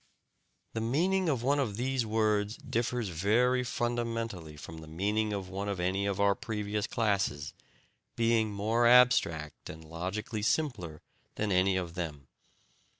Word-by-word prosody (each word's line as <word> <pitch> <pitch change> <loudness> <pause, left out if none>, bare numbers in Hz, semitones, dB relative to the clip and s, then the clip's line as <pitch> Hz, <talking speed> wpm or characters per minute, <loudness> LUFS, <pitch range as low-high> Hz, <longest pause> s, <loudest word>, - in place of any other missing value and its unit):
The 110 - -2
meaning 175 +10 +1
of 130 -6 0
one 140 +3 +2
of 110 -7 -1
these 130 -1 0
words 105 -1 +1
differs 120 -2 -2
very 115 +9 +2
fundamentally 115 -9 -3
from 80 +2 -9
the 80 - -11
meaning 105 +6 0
of 100 -2 -3
one 100 +2 -4
of 100 -3 -3
any 95 +3 0
of 100 -1 -2
our 100 0 +4
previous 105 0 -3
classes, 100 - 0 0.6
being 115 -2 +2
more 110 +4 +2
abstract 120 -12 +4
and 80 0 -9
logically 95 +7 -4
simpler 105 - -1 0.3
than 105 -1 -1
any 95 +1 +3
of 85 -2 -3
them. 75 -6 -5
105 Hz, 145 wpm, -30 LUFS, 90-120 Hz, 0.6 s, our